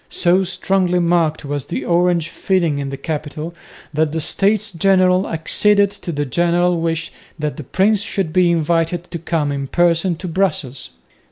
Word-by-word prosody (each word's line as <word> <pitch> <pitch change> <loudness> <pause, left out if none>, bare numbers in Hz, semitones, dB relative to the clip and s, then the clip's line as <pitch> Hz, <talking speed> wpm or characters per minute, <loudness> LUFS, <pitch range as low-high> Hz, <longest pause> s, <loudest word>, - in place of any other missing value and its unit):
So 180 +2 +3
strongly 185 0 0
marked 170 -3 +1
was 145 -1 -4
the 130 - -4
Orange 170 0 +1
feeling 170 -5 0
in 140 -1 -3
the 135 - -5
capital 155 +2 -5 0.4
that 155 0 +1
the 160 - -2
States 205 +6 +1
General 185 +1 +3
acceded 200 +5 +2
to 200 -3 -7
the 145 -2 -2
general 175 +3 +1
wish 165 0 -2 0.3
that 150 -2 -3
the 150 - -6
prince 195 - +1
should 195 -6 -3
be 180 -1 +4
invited 165 +1 0
to 170 - -4
come 155 -2 -1
in 140 -1 -3
person 175 +2 +2
to 180 +3 -7
Brussels. 160 -8 -2
170 Hz, 165 wpm, -19 LUFS, 155-185 Hz, 0.4 s, be